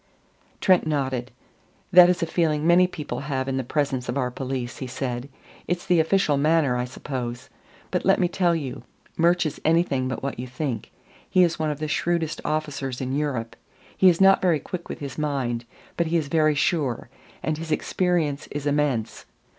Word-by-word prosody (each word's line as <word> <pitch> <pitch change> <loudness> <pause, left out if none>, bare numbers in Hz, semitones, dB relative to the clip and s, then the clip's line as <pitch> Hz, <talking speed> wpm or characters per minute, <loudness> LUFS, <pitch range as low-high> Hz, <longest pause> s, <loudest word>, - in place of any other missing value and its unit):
Trent 185 -4 +4
nodded. 130 -5 -1 0.6
"That 180 -1 +9
is 175 -2 +1
a - - +2
feeling 160 -2 0
many 175 +2 +6
people 155 -5 -5
have 135 -2 -3
in 135 -1 -1
the 130 - -1
presence 130 -2 -1
of 120 - -1
our 125 -2 0
police," 130 -1 -4
he 130 - -4
said. 125 0 -4 0.4
"It's 175 0 -2
the 180 -3 +3
official 160 -3 +2
manner, 150 -3 +3
I 125 0 -1
suppose. 125 -1 -6 0.4
But - - 0
let - - +4
me 180 - +3
tell 175 -1 +1
you 140 -6 -4 0.3
Murch 170 +1 +3
is 155 - -4
anything 155 -5 +2
but 130 - -4
what 140 -3 -3
you 125 - -4
think. 125 -3 -4 0.4
He 185 - +5
is 170 -2 +1
one 155 -1 0
of 150 - -2
the 155 +1 -3
shrewdest 165 +1 -1
officers 145 -4 -2
in 130 0 -2
Europe. 130 -6 -2 0.4
He 190 - +6
is 170 - +2
not 195 0 +6
very 175 -5 +3
quick 175 +4 -7
with - - -6
his 140 0 -6
mind, 130 -6 -1 0.3
but 170 - +1
he 170 +1 +1
is 150 -3 -2
very 155 -1 +3
sure. 140 -7 0 0.3
And 155 -1 -1
his 160 -1 -6
experience 160 -3 0
is 145 0 -5
immense. 145 -6 -1
150 Hz, 190 wpm, -24 LUFS, 130-165 Hz, 0.6 s, That